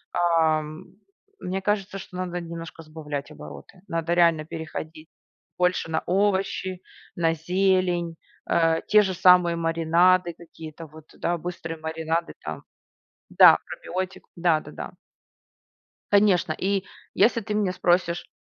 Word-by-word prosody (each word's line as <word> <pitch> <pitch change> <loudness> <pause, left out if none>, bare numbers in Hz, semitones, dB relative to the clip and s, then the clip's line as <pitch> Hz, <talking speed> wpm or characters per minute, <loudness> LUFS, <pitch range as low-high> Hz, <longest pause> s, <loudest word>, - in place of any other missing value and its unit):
Ам, 160 -1 +1 0.5
мне 190 +1 -3
кажется, 195 0 -1
что 190 -1 -9
надо 180 -1 -3
немножко 165 -1 -8
сбавлять 150 -2 -6
обороты. 75 - -12
Надо 165 -1 -1
реально 170 -3 +3
переходить 160 0 -7 0.5
больше 180 -2 +1
на 160 - -1
овощи, 190 -1 0 0.3
на 165 -2 +1
зелень. 180 0 0 0.3
Э, 165 -1 +2
те 210 - +6
же 190 -2 -1
самые 180 -1 +5
маринады, 170 +2 +2
какие-то 165 -1 -11
вот, 155 0 -15
да, 175 +1 -1
быстрые 165 -1 -6
маринады 160 +1 -2
там. - - -6 0.7
Да, - - +8
пробиотик. 185 +1 -6
Да-да-да. 170 -3 -1 1.2
Конечно. 200 -5 +4
И 195 +4 -1 0.3
если 230 0 +3
ты 215 -1 -5
меня 210 -3 +1
спросишь, 175 -1 0
170 Hz, 115 wpm, -25 LUFS, 160-185 Hz, 1.2 s, Да